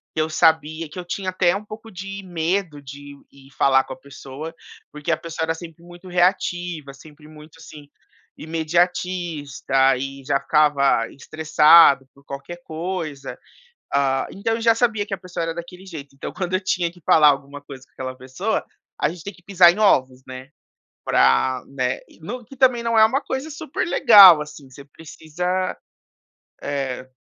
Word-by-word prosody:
que 155 - +1
eu 155 - -1
sabia 160 0 +1
que 150 - -13
eu - - -5
tinha 185 +2 -4
até 185 -1 +2
um 205 +1 -6
pouco 220 +1 -11
de 195 +2 -8
medo 175 -2 -2
de 140 +1 -11 0.2
ir 135 0 -19
falar 135 -1 +4
com - - -8
a - - -13
pessoa, 140 +3 -9 0.4
porque 150 +2 -4
a 160 - +1
pessoa 165 0 -5
era 165 - -1
sempre 165 0 -12
muito 175 +1 -14
reativa, 175 -4 -1
sempre 150 +2 -16
muito, 155 0 -15
assim, 150 -2 -13 0.5
imediatista 160 -4 0
e 135 +1 -6
já 140 0 +1
ficava 140 -6 +2
estressado 155 -1 +4
por 140 - -22
qualquer 140 +6 -8
coisa. 160 -5 -5 0.6
Hã, 135 -1 +1
então 225 +3 -2
eu 230 - -5
já 230 0 +4
sabia 225 -3 0
que 200 - -6
a - - -2
pessoa 180 -2 -6
era 165 0 -3
daquele 175 +2 -10
jeito, 150 -7 -10
então 135 - -7
quando 185 -1 -4
eu - - +1
tinha 180 -2 -1
que 175 0 -20
falar 150 -2 +6
alguma 140 0 -3
coisa 135 -2 -12
com - - -39
aquela 130 0 -7
pessoa, 130 +12 -3 0.3
a - - +2
gente 165 0 -10
tem 200 - -7
que 175 - -22
pisar 180 -2 +6
em 180 - -7
ovos, 130 -11 +2
né? 130 0 -9 0.6
Pra, 95 - +2
né, 130 -2 -2 0.2
no 245 +9 -6
que 270 - -14
também 250 -2 +3
não 230 -1 +1
é 220 - +8
uma 260 +6 +1
coisa 265 +4 -5
super 305 0 -4
legal 200 - +8
assim, 150 -2 -12
você 140 +2 -13
precisa, 165 +5 -4 0.9
eh 130 -2 -4
160 Hz, 175 wpm, -21 LUFS, 140-185 Hz, 0.9 s, é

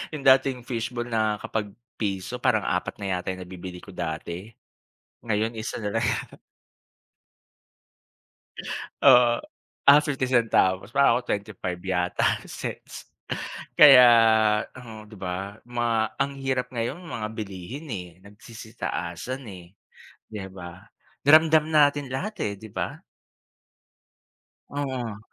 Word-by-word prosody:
Yung 145 - -7
dating 130 -1 +4
fishball 120 0 -3
na 110 -2 +1
kapag 105 -2 -3 0.3
piso 95 -4 -3
parang - - +2
apat - - -1
na 100 -1 -4
yata 90 - -5
yung 95 - -8
nabibili 90 0 -9
ko 100 - -11
dati, 85 +2 -5 0.8
ngayon 110 0 0
isa 110 - -4
na 105 +2 -1
lang. 115 - 0 3.0
Oo. 120 -1 +6 0.5
Ah, 145 +1 +8
fifty 135 -3 -1
centavos 110 -4 +2
pa 140 -4 +5
o 125 - -5
twenty 100 -1 -2
five 90 -1 -4
yata 90 -1 -1 0.2
cents - - -8 0.7
kaya 135 -4 +10 0.7
mhm, 115 -4 -11
'di - - -14
ba, 95 +2 -5
mga 120 -1 -1 0.2
ang 140 0 0
hirap 130 -2 -1
ngayon 120 +5 -2
mga 115 -10 -4
bilihin, 110 - -7
eh, 90 -6 -5 0.2
nagsisitaasan 110 +1 -6
eh, 90 0 -13 0.6
di 110 - -6
ba? 90 -2 -10 0.5
Ramdam 155 +1 +6
natin 145 -2 +3
lahat, 185 +12 -4
eh, 100 - -1
di 110 +1 -11
ba? - - -5 1.7
Oo. 130 -6 -4
115 Hz, 120 wpm, -25 LUFS, 95-130 Hz, 3.0 s, kaya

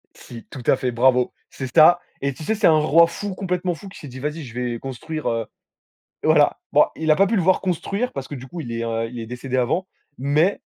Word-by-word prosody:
Si, 115 -2 -11
tout 130 - -9
à - - +5
fait, 130 -1 -2
bravo, 125 +1 +3 0.2
c'est 130 -3 -7
ça 170 +3 +7 0.2
et 140 0 -1
tu 155 - -10
sais, 220 - 0
c'est 215 -1 +3
un 160 - +6
roi 165 +2 +5
fou, 195 +4 -5
complètement 180 -1 -2
fou, 195 +5 -11
qui 190 - -12
s'est 145 - -9
dit: 130 - -9
«Vas-y, 150 +3 -4
je 120 -3 -10
vais 120 -1 -2
construire, 135 +5 -6
heu», 115 -1 -1 0.8
voilà. - - +4
Bon, - - +6
il 160 0 -3
a 155 - +6
pas 195 - +4
pu 215 +4 0
le 195 - +2
voir 185 +2 +3
construire 195 +6 -2
parce 135 -1 -5
que, 145 - -7
du 130 -1 -8
coup, 170 +5 -7
il 120 -6 -7
est 115 0 -3
r 115 0 -1
il 120 +1 -8
est 115 - -5
décédé 125 +2 -4
avant, 170 +10 0 0.3
mais 150 +8 +2
145 Hz, 250 wpm, -22 LUFS, 125-175 Hz, 0.8 s, ça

